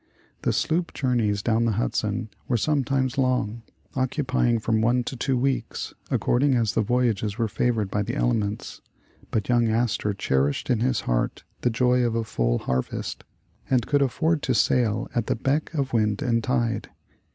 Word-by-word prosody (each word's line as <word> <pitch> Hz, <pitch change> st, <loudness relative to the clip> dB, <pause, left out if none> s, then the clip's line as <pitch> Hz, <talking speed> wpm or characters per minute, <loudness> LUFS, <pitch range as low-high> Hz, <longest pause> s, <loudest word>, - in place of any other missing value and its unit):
The -, -, +1 dB
sloop 170 Hz, +2 st, 0 dB
journeys 115 Hz, -7 st, +1 dB
down 115 Hz, 0 st, +2 dB
the 115 Hz, -, +1 dB
Hudson 110 Hz, +1 st, -1 dB, 0.2 s
were 120 Hz, -, +2 dB
sometimes 135 Hz, 0 st, 0 dB
long, 125 Hz, -4 st, 0 dB, 0.3 s
occupying 130 Hz, -2 st, +1 dB
from 110 Hz, 0 st, 0 dB
one 120 Hz, +2 st, +2 dB
to 130 Hz, -, -5 dB
two 130 Hz, +1 st, 0 dB
weeks, 135 Hz, +1 st, -2 dB, 0.2 s
ac -, -, +2 dB
cording 135 Hz, +2 st, +2 dB
as 115 Hz, -6 st, +1 dB
the 115 Hz, -, +2 dB
voyagers 110 Hz, -2 st, 0 dB
were 115 Hz, -2 st, +1 dB
favored 110 Hz, -2 st, 0 dB
by 105 Hz, -, 0 dB
the 120 Hz, +6 st, -3 dB
elements; 110 Hz, -6 st, -1 dB, 0.5 s
but 105 Hz, -, -1 dB
young 120 Hz, -1 st, +3 dB
Astor 110 Hz, -2 st, 0 dB
cherished 70 Hz, -, 0 dB
in 120 Hz, -, +2 dB
his 125 Hz, -2 st, +1 dB
heart -, -, -1 dB, 0.2 s
the 125 Hz, -, +2 dB
joy 125 Hz, +2 st, +2 dB
of 115 Hz, -1 st, 0 dB
a 115 Hz, -, 0 dB
full -, -, 0 dB
harvest, 65 Hz, 0 st, -3 dB, 0.5 s
and 125 Hz, -3 st, +2 dB
could 145 Hz, -1 st, +2 dB
afford 155 Hz, +4 st, +1 dB
to 130 Hz, -1 st, 0 dB
sail 110 Hz, 0 st, +2 dB
at 120 Hz, -3 st, -1 dB
the -, -, +1 dB
beck 135 Hz, +7 st, 0 dB
of 135 Hz, -3 st, -1 dB
wind 110 Hz, +3 st, +1 dB
and 115 Hz, -3 st, +1 dB
tide. 120 Hz, -2 st, 0 dB
120 Hz, 175 wpm, -25 LUFS, 110-130 Hz, 0.5 s, young